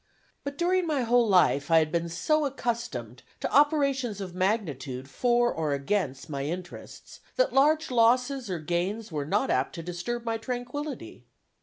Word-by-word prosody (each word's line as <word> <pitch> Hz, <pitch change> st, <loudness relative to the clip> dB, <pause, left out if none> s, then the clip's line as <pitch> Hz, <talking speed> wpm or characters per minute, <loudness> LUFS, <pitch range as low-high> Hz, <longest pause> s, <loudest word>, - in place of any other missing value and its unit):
But 280 Hz, 0 st, -5 dB
during 360 Hz, +1 st, +1 dB
my 295 Hz, -4 st, 0 dB
whole 240 Hz, 0 st, +3 dB
life 155 Hz, -7 st, +3 dB
I 165 Hz, -, +6 dB
had 155 Hz, -1 st, +3 dB
been 170 Hz, 0 st, -1 dB
so 305 Hz, -, +1 dB
much 280 Hz, -3 st, -1 dB
accustomed 235 Hz, -3 st, -4 dB, 0.2 s
to -, -, -2 dB
operations 275 Hz, -7 st, +2 dB
of 185 Hz, -3 st, -6 dB
magnitude 150 Hz, -, -2 dB
for 240 Hz, -, +2 dB
or 155 Hz, -3 st, -1 dB
against 140 Hz, -1 st, -2 dB
my 140 Hz, -2 st, -4 dB
interests, 175 Hz, +3 st, -7 dB, 0.2 s
that -, -, +2 dB
large 300 Hz, +2 st, +3 dB
losses 250 Hz, +1 st, +2 dB
or 180 Hz, -, -2 dB
gains 175 Hz, +7 st, -2 dB
were 145 Hz, -2 st, -3 dB
not 205 Hz, +10 st, +1 dB
apt -, -, 0 dB
to 165 Hz, -, -6 dB
disturb 180 Hz, +8 st, -4 dB
my 225 Hz, -1 st, -1 dB
tranquillity. 250 Hz, +5 st, -6 dB
225 Hz, 165 wpm, -27 LUFS, 170-265 Hz, 0.2 s, I